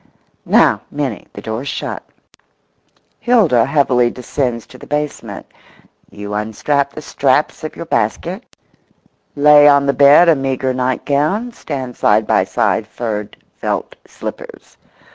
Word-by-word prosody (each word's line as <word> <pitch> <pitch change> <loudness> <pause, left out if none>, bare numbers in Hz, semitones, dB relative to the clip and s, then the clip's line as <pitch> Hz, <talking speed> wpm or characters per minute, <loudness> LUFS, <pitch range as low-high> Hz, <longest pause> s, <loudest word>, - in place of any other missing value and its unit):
Now, - - +4
Minnie, 140 -7 -4
the 100 - -10
door's 110 +5 -4
shut; - - -4 1.2
Hilda 195 - +3
heavily 130 -4 +2
descends 125 -1 -3
to 130 - -15
the - - -12
basement; 150 0 -4 0.6
you 105 0 -8
unstrap 135 +7 -1
the 155 - -8
straps 140 +3 0
of 155 - -6
your 170 - -7
basket, 170 - -2 0.9
lay 150 0 +6
on 140 -1 +5
the 140 - +2
bed 145 +5 +6
a 165 - +6
meagre 135 -1 -2
nightgown, 145 - -1
stand 130 - -6
side 105 +1 +2
by - - +2
side 110 - 0
furred 110 -3 -5 0.2
felt - - -3
slippers. - - -9
140 Hz, 125 wpm, -17 LUFS, 120-150 Hz, 1.2 s, lay